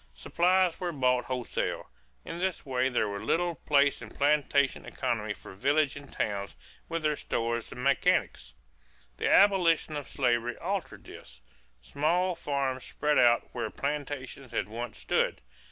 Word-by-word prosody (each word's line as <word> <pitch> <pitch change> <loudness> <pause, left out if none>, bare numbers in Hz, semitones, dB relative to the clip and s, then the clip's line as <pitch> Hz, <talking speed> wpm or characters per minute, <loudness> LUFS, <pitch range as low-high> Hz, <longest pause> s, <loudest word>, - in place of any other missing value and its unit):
Supplies 180 - +2
were 180 -1 -2
bought 125 -4 +1
wholesale. 125 -2 -3 0.4
In 170 - -6
this 185 -1 -2
way 130 -1 +1
there 120 -4 +1
was 100 0 -4
little 175 0 +1
place 145 -2 +2
in - - -8
plantation 140 -1 +2
economy 115 -4 -2
for - - -12
villages 145 +7 +1
and 140 - -15
towns 100 -1 -3 0.3
with 165 -1 -2
their 150 -1 +2
stores 115 -3 -2
and 125 - -7
mechanics. 130 - +1 0.6
The - - 0
abolition 180 -6 +4
of 145 -2 -5
slavery 120 -2 0
altered 190 +1 -4
this. 65 0 -12 0.4
Small 175 - +1
farms 140 -5 -2
spread 150 0 +1
out 120 -1 +4
where - - -3
plantations 140 -3 -4
had 105 - -1
once 120 +2 -6
stood. - - 0
140 Hz, 145 wpm, -29 LUFS, 120-155 Hz, 0.6 s, abolition